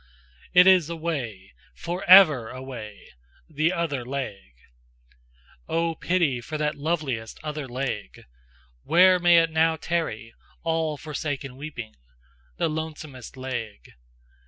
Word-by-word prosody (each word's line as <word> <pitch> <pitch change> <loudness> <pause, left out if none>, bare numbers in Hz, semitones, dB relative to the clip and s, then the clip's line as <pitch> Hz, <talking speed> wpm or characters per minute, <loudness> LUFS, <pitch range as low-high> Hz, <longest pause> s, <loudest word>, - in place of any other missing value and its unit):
Hu! 180 - +10
It - - +5
is 185 -4 +5
away! 140 - -4 0.2
For 175 - -5
ever 155 - +7
away! 125 -5 -9 0.4
The 155 +2 0
other 165 -8 -2
leg! 120 - -6 1.1
Oh, 165 0 0
pity 160 -7 0
for 155 +6 -5
that 150 0 0
loveliest 145 -7 -3
other 150 -2 -5
leg! 125 - -5 0.6
Where 180 - +5
may 175 -1 +5
it 165 - -2
now 160 0 +3
tarry, 145 -10 -3 0.3
all 160 -2 -1
forsaken 145 -3 -5
weeping? 130 -6 -8 0.6
The - - +1
lonesomest 155 -5 -6
leg? 120 - -6
150 Hz, 115 wpm, -25 LUFS, 125-165 Hz, 1.1 s, Hu